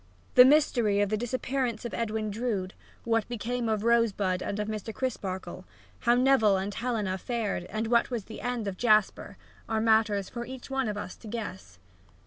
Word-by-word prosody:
The 250 - +9
mystery 245 -8 +3
of 205 -1 +2
the 215 - +1
disappearance 245 0 -2
of 235 - -5
Edwin 220 -2 -2
Drood, 205 -4 -2 0.3
what 225 -2 +1
became 240 0 -2
of 215 -1 0
Rosebud 210 -6 +2
and 200 - -3
of 210 - -2
Mr. 215 0 -4
Crisparkle, 190 -8 -4 0.4
how 240 0 +3
Neville 245 -6 +4
and 195 +2 -3
Helena 210 -4 -2
fared 215 -5 -2
and 215 +4 -3
what 235 +1 +2
was 240 -5 -3
the 220 - -9
end 245 -3 -2
of 190 -2 -4
Jasper, 215 -4 +2 0.3
are 220 -1 +1
matters 220 -3 +2
for 235 - -6
each 260 +1 -9
one 265 -2 0
of 210 -1 -3
us 185 -3 -6
to 225 - -12
guess. 205 - -6
220 Hz, 180 wpm, -28 LUFS, 205-240 Hz, 0.4 s, The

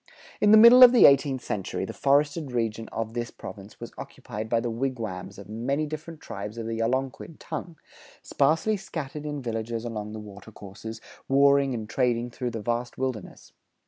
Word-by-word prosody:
In 210 - +4
the 215 - +9
middle 235 +3 +9
of 250 -1 +10
the 245 - +7
eighteenth 140 -2 +4
century, 95 -3 -3
the - - -7
forested 145 +1 +1
region 115 -2 -2
of 115 0 -4
this 120 -1 -3
province 100 0 -11
was - - -9
occupied 110 +1 -7
by 115 - +2
the 120 0 -3
wigwams 115 -6 -4
of 100 -1 -11
many 125 +8 -2
different 155 +1 -7
tribes 105 +2 -7
of 115 - -5
the 115 0 -3
Algonquin 130 +6 -2
tongue, 170 -3 -7 0.5
sparsely 160 +9 +1
scattered 150 -5 -6
in 145 -2 -5
villages 115 0 -4
along 105 -2 -5
the 110 - -6
water 105 0 -11
courses, 110 +2 -9 0.3
warring 140 -1 +4
and 110 -2 -5
trading 120 0 0
through 125 +1 -4
the 115 -3 -6
vast 120 +1 -2
wilderness. 130 -6 -5
120 Hz, 175 wpm, -26 LUFS, 110-140 Hz, 0.5 s, of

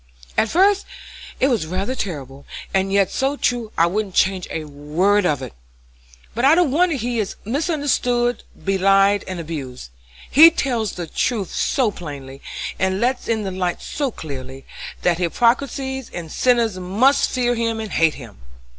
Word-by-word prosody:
At 225 - +2
first 390 - +3 0.5
it 265 - +4
was 225 - 0
rather 190 +8 -2
terrible, 140 - -6 0.3
and 195 0 +1
yet 195 -2 +2
so 270 +2 0
true 240 -5 -1
I 165 - +5
wouldn't 195 +2 -2
change 190 -1 +2
a 160 - -4
word 160 +7 +1
of 145 -4 -1
it. - - -8 0.8
But 235 - -2
I 285 +4 +6
don't 345 -5 +3
wonder 335 +2 +2
he 240 -2 -2
is 205 - -2
misunderstood, 250 - 0 0.2
belied, 195 +1 +3
and 185 -2 -5
abused. 135 - -7 0.4
He 315 +5 +9
tells 245 - -1
the 175 - -5
truth 205 +4 -2
so 250 -6 +1
plainly, 140 -6 -9 0.4
and 190 0 +1
lets 250 +3 0
in 220 -2 0
the 195 - -3
light 180 -1 -2
so 285 -2 -3
clearly, 135 - -8 0.4
that 175 -1 +2
hypocrites 235 - +1
and 265 - -6
sinners 235 -6 +2
must 225 +10 +2
fear 245 -2 +1
and 225 -2 -2
hate 160 -1 +2
him. 115 - -12
205 Hz, 155 wpm, -21 LUFS, 170-250 Hz, 0.8 s, He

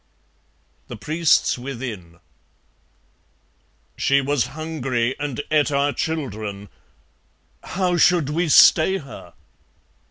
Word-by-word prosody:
(The - - -8
Priests 155 +1 +1
within) 115 -10 -8 1.8
She 140 0 +2
was 140 -2 0
hungry 135 -6 -2
and 145 -2 -4
ate 150 -1 +2
our 140 0 +1
children; 110 -11 -5 0.9
how 180 -2 -1
should 170 -4 +3
we 165 +2 -1
stay 175 +5 +6
Her? 140 -6 -12
140 Hz, 90 wpm, -21 LUFS, 120-160 Hz, 1.8 s, stay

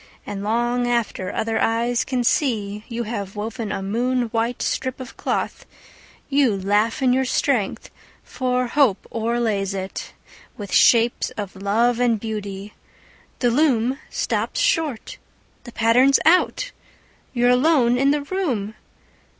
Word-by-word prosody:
And 200 -1 -5
long 240 +3 0
after 235 -6 -1
other 225 0 -1
eyes 235 +1 +1
can 255 -2 -1
see 215 -6 0
You 235 -1 -3
have 205 -3 -5
woven 220 0 -4
a 195 - -3
moon 240 +4 0
white 230 +2 -1
strip 260 0 -2
of 255 - -9
cloth, - - -3 0.6
You 275 -7 +2
laugh 210 +6 +1
in 250 -1 +4
your 265 +1 +2
strength, 255 -4 -1 0.3
for 250 -1 -1
Hope 245 -5 +2
overlays 220 -4 -1
it 190 0 -6 0.4
With 205 -2 -7
shapes 235 0 +4
of 205 -2 -5
love 225 +5 +1
and 235 -3 +2
beauty. 205 -2 -6 0.6
The 245 -2 +1
loom 260 -1 +2
stops - - -2
short! 325 - -1 0.5
The 240 - -9
pattern's 245 +5 +4
out 365 +9 +3 0.6
You're 245 0 +3
alone 250 -2 +3
in 275 +1 +3
the 290 0 +1
room! 280 - -2
235 Hz, 135 wpm, -22 LUFS, 210-255 Hz, 0.6 s, in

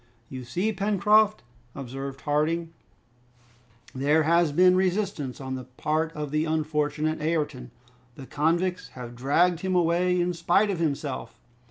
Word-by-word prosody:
"You 130 -1 -7
see, 180 - -1
Pencroft," 210 +1 +3 0.3
observed 135 +1 -6
Harding, 160 +3 -1 1.2
"there 145 +4 +2
has 170 0 +3
been 180 +4 +5
resistance 185 -7 -1
on 130 -1 -5
the 130 -1 -5
part 155 +5 -2
of 150 -2 -5
the 155 +1 +1
unfortunate 155 0 -1
Ayrton. 150 -6 -2 0.5
The 135 - -10
convicts 170 +6 0
have 120 -1 -8
dragged 160 +7 +2
him 190 0 -1
away 180 +1 +2
in 175 0 0
spite 175 +5 +2
of 180 - -3
himself! 140 -7 -3
155 Hz, 135 wpm, -26 LUFS, 140-180 Hz, 1.2 s, been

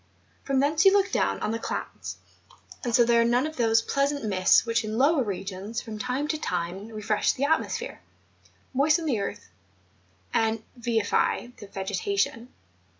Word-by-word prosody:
P"rom 270 -1 +1
thence 300 +3 +2
you 390 - +7
look 395 -1 +3
down - - +1
on - - -1
the 230 - -2
clouds; - - -5 0.7
and 240 -2 0
so 245 - +6
there 235 0 +4
are - - +4
none 240 +3 +2
of 310 0 -5
those 225 -2 +3
pleasant 280 +2 0
2U - - -10
MOUNTAIN 215 - -2
ADVENTURES. 185 - -2
mists - - +5
which 230 -1 +1
in 215 +1 -3
lower 285 +3 +4
regions, 200 +2 -4
from 220 -3 -7
time 255 +5 -2
to 310 - -1
time 180 - -3
re¬ 215 -2 -7
fresh 210 0 +2
the 270 - -3
atmosphere, 320 +3 -1 0.7
moisten 305 +5 +3
the 255 -8 +1
earth, 200 - -5 0.8
and 225 0 +1
vivify 235 0 0
the 205 - -9
vegetation. 200 +4 -2
230 Hz, 180 wpm, -26 LUFS, 210-275 Hz, 0.8 s, you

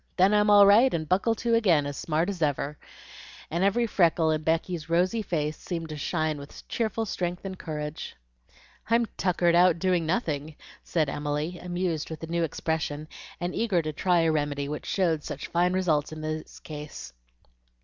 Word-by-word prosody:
Then 190 +3 +5
I'm 210 0 +4
all 205 -1 +8
right, 225 +6 +6
and 155 -1 -3
buckle 195 +6 +2
to 235 +1 -1
again, 180 -11 +4
as 145 0 -4
smart 160 +4 0
as 195 -4 -4
ever;" 145 -1 0 0.8
and 170 +3 0
every 220 +5 +3
freckle 170 -6 +3
in 155 -1 0
Becky's 165 0 -1
rosy 180 +7 +2
face 155 -6 -2
seemed 165 -3 -5
to 155 - -5
shine 155 0 -1
with 140 +1 -12
cheerful 225 -1 -1
strength 180 -2 -3
and 190 -1 -6
courage. 150 -1 -5 0.7
"I'm 230 +1 +4
'tuckered 175 -2 +2
out' 175 0 +5
doing 175 -2 +1
nothing," 155 -5 -1 0.3
said 160 -3 0
Emily, 150 +4 -3
amused 175 -3 -2
with 160 - -7
the - - -4
new 170 +1 -1
expression, 155 -1 -2 0.3
and 175 +1 -3
eager 195 -7 +1
to 155 0 -3
try 175 +2 +2
a 165 -1 +3
remedy 145 -2 -1
which 150 +1 -5
showed 165 -6 +1
such 145 - -6
fine 175 +1 +2
results 160 -6 +1
in 155 0 -7
this 155 0 -5
case. 150 - -8
165 Hz, 180 wpm, -27 LUFS, 155-185 Hz, 0.8 s, all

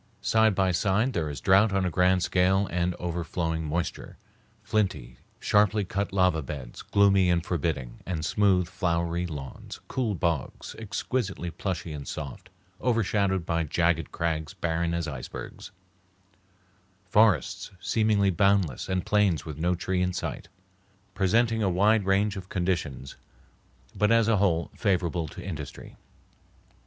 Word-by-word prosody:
Side 110 -2 +3
by 95 -1 +2
side 100 +8 +1
there 80 -4 -1
is 70 - -5
drouth 100 +3 +4
on 95 -1 +1
a 90 - 0
grand 90 +1 +3
scale 95 +2 +2
and 90 0 0
overflowing 85 -1 -3
moisture; 85 +3 -3 0.5
flinty, 80 - -1 0.2
sharply 105 0 +2
cut 100 +2 -2
lava 90 -4 +2
beds, 65 -3 -7
gloomy 100 -2 +3
and 85 -1 +1
forbidding, 75 -7 -2
and 80 -4 -3
smooth, 95 -3 +2
flowery 85 -1 -1
lawns; 70 -5 -8
cool 115 -6 -1
bogs, 85 -5 -2
exquisitely 105 -3 -3
plushy 85 -3 -4
and 70 -3 -7
soft, 75 +4 -7 0.3
overshadowed 100 -6 +1
by 85 -1 0
jagged 80 0 0
crags 80 -2 -2
barren 85 0 -1
as 85 -1 -2
icebergs; 70 -4 -7 1.4
forests 100 - +2
seemingly 105 -2 +2
boundless 100 -7 +1
and 95 -1 -1
plains 105 -6 +2
with 75 -2 -7
no 90 +2 +1
tree 90 +1 -1
in 90 0 0
sight; 85 - -4 0.7
presenting 110 +4 +2
a 100 - +2
wide 100 +3 +3
range 100 +2 +2
of 95 -1 -8
conditions, 85 -8 -2 0.8
but 105 +1 +2
as 115 -1 +4
a 115 -2 +3
whole 85 -4 +1
favorable 90 -5 0
to - - -9
industry. 75 -7 -7
90 Hz, 135 wpm, -27 LUFS, 85-100 Hz, 1.4 s, drouth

